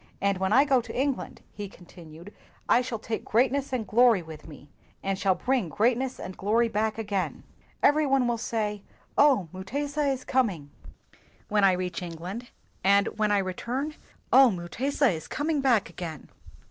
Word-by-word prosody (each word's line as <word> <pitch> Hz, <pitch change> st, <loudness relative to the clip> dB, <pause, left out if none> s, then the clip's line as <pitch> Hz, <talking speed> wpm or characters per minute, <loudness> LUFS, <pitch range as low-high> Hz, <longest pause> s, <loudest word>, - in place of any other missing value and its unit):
And 200 Hz, -1 st, 0 dB
when 190 Hz, +1 st, 0 dB
I 270 Hz, +6 st, +6 dB
go 270 Hz, -3 st, +3 dB
to 240 Hz, -, -6 dB
England, 275 Hz, -1 st, -2 dB
' -, -, -34 dB
lie 205 Hz, -, -3 dB
continued, 175 Hz, 0 st, -14 dB, 0.2 s
' -, -, -32 dB
I -, -, +3 dB
shall 245 Hz, -2 st, -4 dB
take 220 Hz, +1 st, -4 dB
greatness 265 Hz, +5 st, +1 dB
and 245 Hz, -4 st, -2 dB
glory 230 Hz, -4 st, +4 dB
with 160 Hz, -1 st, -11 dB
me, 145 Hz, -2 st, -12 dB, 0.4 s
and 195 Hz, 0 st, 0 dB
shall 190 Hz, -2 st, +2 dB
bring 250 Hz, -7 st, 0 dB
greatness 245 Hz, -, 0 dB
and 185 Hz, 0 st, -7 dB
glory 230 Hz, +4 st, +1 dB
back 215 Hz, +1 st, -1 dB
again. 205 Hz, -4 st, -3 dB, 0.4 s
Every 300 Hz, 0 st, +4 dB
one 270 Hz, -2 st, +2 dB
will 235 Hz, -1 st, -1 dB
say, 210 Hz, -3 st, -2 dB, 0.3 s
'Oh, 270 Hz, -, +4 dB
Mutesa 285 Hz, +10 st, -2 dB
is 260 Hz, -1 st, -4 dB
coming!' 190 Hz, -, 0 dB, 0.8 s
when 210 Hz, -1 st, +2 dB
I 195 Hz, -1 st, +6 dB
reach 180 Hz, -1 st, -3 dB
England; 180 Hz, +8 st, -7 dB, 0.3 s
and 200 Hz, +1 st, +5 dB
when 215 Hz, -1 st, +2 dB
I 205 Hz, -, +4 dB
return, 240 Hz, +10 st, -3 dB, 0.4 s
'Oh, 265 Hz, -1 st, +8 dB
Mutesa 235 Hz, +10 st, 0 dB
is 160 Hz, -3 st, -6 dB
coming 295 Hz, 0 st, -1 dB
back 245 Hz, -6 st, +3 dB
again!' 165 Hz, -5 st, -7 dB
215 Hz, 170 wpm, -27 LUFS, 185-260 Hz, 0.8 s, Oh